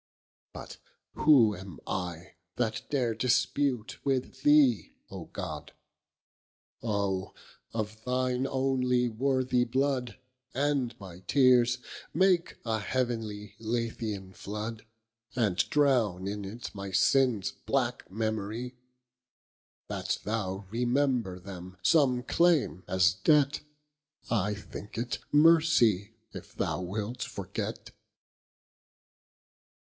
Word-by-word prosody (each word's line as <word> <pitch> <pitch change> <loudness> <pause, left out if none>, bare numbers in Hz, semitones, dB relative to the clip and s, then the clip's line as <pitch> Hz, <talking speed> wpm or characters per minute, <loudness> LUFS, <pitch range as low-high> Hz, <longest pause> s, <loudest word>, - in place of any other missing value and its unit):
But - - -9 0.4
who 125 -9 +5
am 95 -3 -10
I, 90 -2 -4 0.2
that 110 -3 -1
dare 125 -6 +1
dispute 125 +1 0
with 135 -1 -1
thee 145 -6 +4 0.2
O - - -7
God? - - -7 1.1
Oh! 100 -4 -1 0.4
of 110 -1 -4
thine 125 0 0
onely 130 -2 +1
worthy 130 +1 +1
blood, 130 0 -1 0.4
And 135 -4 0
my 90 -3 -10
teares, 125 +2 +4 0.4
make 180 -1 +3
a 110 -1 0
heavenly 110 -3 -3
Lethean 110 -4 -3
flood, 105 +3 -6 0.5
And 105 -7 +1
drowne 120 -11 +2
in 100 0 -4
it 115 +5 -7
my 100 -1 -6
sinnes 115 +2 +3 0.2
black - - 0
memorie; 110 +3 -3 1.1
That - - -2
thou 100 -2 -3
remember 120 -5 +1
them, 95 -1 -9
some 130 - +4
claime 160 - +2
as 90 -2 +4
debt, 140 +9 +3 0.7
I 105 -2 +1
thinke 105 +1 -9
it 120 +1 -2
mercy 145 - +4 0.2
if - - -10
thou - - -1
wilt 105 +6 -4
forget. - - -5
115 Hz, 100 wpm, -29 LUFS, 100-130 Hz, 1.1 s, who